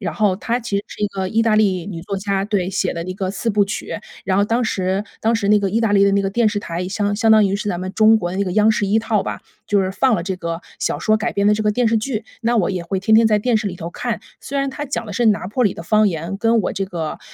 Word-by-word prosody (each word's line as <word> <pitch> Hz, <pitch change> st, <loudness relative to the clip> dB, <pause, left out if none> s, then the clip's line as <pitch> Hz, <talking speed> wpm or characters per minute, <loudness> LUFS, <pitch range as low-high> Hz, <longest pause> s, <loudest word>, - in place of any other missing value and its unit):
然 170 Hz, -6 st, -3 dB
后 200 Hz, -3 st, +2 dB
它 235 Hz, +4 st, -2 dB
其 220 Hz, -3 st, -2 dB
实 200 Hz, -, -2 dB
是 -, -, -9 dB
一 205 Hz, -, +2 dB
个 190 Hz, -1 st, -3 dB
意 225 Hz, +3 st, +1 dB
大 220 Hz, -2 st, +3 dB
利 190 Hz, -5 st, +2 dB
女 175 Hz, -5 st, -6 dB
作 195 Hz, +1 st, -4 dB
家， 195 Hz, 0 st, -1 dB
对， 195 Hz, -3 st, -1 dB
写 190 Hz, -1 st, -1 dB
的 170 Hz, -, -3 dB
一 185 Hz, -, -4 dB
个 190 Hz, -1 st, -2 dB
四 230 Hz, -, -2 dB
部 205 Hz, -1 st, +3 dB
曲。 195 Hz, -, -5 dB, 0.3 s
然 190 Hz, +1 st, +1 dB
后 205 Hz, -, +4 dB
当 230 Hz, +3 st, 0 dB
时 190 Hz, -2 st, -1 dB, 0.2 s
当 225 Hz, +1 st, +2 dB
时 200 Hz, -3 st, -1 dB
那 210 Hz, 0 st, +5 dB
个 200 Hz, -1 st, 0 dB
意 225 Hz, +3 st, +1 dB
大 225 Hz, -3 st, +1 dB
利 200 Hz, -1 st, +5 dB
的 200 Hz, -, +3 dB
那 200 Hz, 0 st, +2 dB
个 195 Hz, -, -1 dB
电 230 Hz, +1 st, +2 dB
视 205 Hz, -1 st, -2 dB
台， 175 Hz, 0 st, -4 dB
相 205 Hz, +1 st, -1 dB
相 225 Hz, 0 st, +4 dB
当 215 Hz, -1 st, +6 dB
于 195 Hz, +1 st, 0 dB
是 210 Hz, -, -4 dB
咱 180 Hz, -2 st, -2 dB
们 185 Hz, +1 st, -5 dB
中 220 Hz, 0 st, +6 dB
国 175 Hz, -4 st, -2 dB
的 185 Hz, -, -4 dB
那 200 Hz, -, +1 dB
个 180 Hz, -, -3 dB
央 215 Hz, +2 st, +4 dB
视 210 Hz, -2 st, 0 dB
一 210 Hz, +3 st, +3 dB
套 220 Hz, -3 st, 0 dB
吧， -, -, -4 dB, 0.3 s
就 200 Hz, -1 st, +2 dB
是 185 Hz, -, -1 dB
放 255 Hz, +5 st, +2 dB
了 170 Hz, -, -1 dB
这 190 Hz, +1 st, -3 dB
个 170 Hz, -1 st, -4 dB, 0.2 s
小 -, -, -1 dB
说 215 Hz, 0 st, +3 dB
改 220 Hz, +2 st, -2 dB
编 200 Hz, +1 st, +2 dB
的 -, -, +5 dB
这 215 Hz, -, -2 dB
个 210 Hz, -, +3 dB
电 245 Hz, 0 st, +2 dB
视 225 Hz, -, +2 dB
剧。 220 Hz, 0 st, -2 dB, 0.2 s
那 235 Hz, +1 st, +1 dB
我 195 Hz, -3 st, +2 dB
也 180 Hz, -2 st, -3 dB
会 190 Hz, +2 st, -2 dB
天 220 Hz, +3 st, 0 dB
天 225 Hz, 0 st, +6 dB
在 210 Hz, -1 st, +2 dB
电 240 Hz, 0 st, +2 dB
视 215 Hz, -1 st, -1 dB
里 180 Hz, -, -3 dB
头 170 Hz, 0 st, -6 dB
看。 235 Hz, +2 st, -3 dB, 0.2 s
虽 280 Hz, -, -5 dB
然 275 Hz, 0 st, 0 dB
他 290 Hz, +2 st, -5 dB
讲 265 Hz, -4 st, -3 dB
的 210 Hz, -, -7 dB
是 235 Hz, +4 st, +1 dB
拿 205 Hz, -3 st, +2 dB
坡 245 Hz, +4 st, 0 dB
里 200 Hz, -, +1 dB
的 -, -, -8 dB
方 215 Hz, +3 st, +3 dB
言， 170 Hz, +3 st, -4 dB
跟 225 Hz, +2 st, +2 dB
我 -, -, -2 dB
这 195 Hz, -, -2 dB
个 165 Hz, -4 st, -5 dB
205 Hz, 345 characters per minute, -20 LUFS, 190-220 Hz, 0.3 s, 当